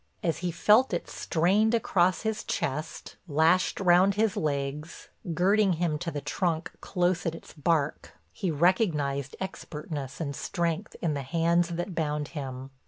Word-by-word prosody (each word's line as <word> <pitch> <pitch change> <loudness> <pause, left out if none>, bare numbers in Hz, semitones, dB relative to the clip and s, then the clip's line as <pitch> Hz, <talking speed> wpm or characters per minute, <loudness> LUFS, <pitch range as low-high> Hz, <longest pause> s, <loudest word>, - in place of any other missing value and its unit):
As 165 -2 0
he 180 - -2
felt 210 +6 +4
it - - -4
strained 200 +7 +2
across 185 -5 +2
his 220 -1 -2
chest, 150 +4 -4
lashed 165 +4 +3
round 190 +1 +5
his 215 -1 +1
legs, 145 +1 -3 0.3
girding 195 +2 +3
him 165 -2 -1
to 175 - -3
the 150 -3 -4
trunk 170 0 -1
close 180 -1 0
at 165 - -1
its - - -12
bark, 150 -1 -1 0.2
he 190 - -3
recognized 150 - +1
expertness 150 -7 -6
and 140 -4 -3
strength 170 +4 -2
in 165 -3 +1
the 140 - -2
hands 170 +4 +1
that 175 +2 -3
bound 150 -3 -2
him. 135 -3 -6
170 Hz, 150 wpm, -28 LUFS, 150-185 Hz, 0.3 s, round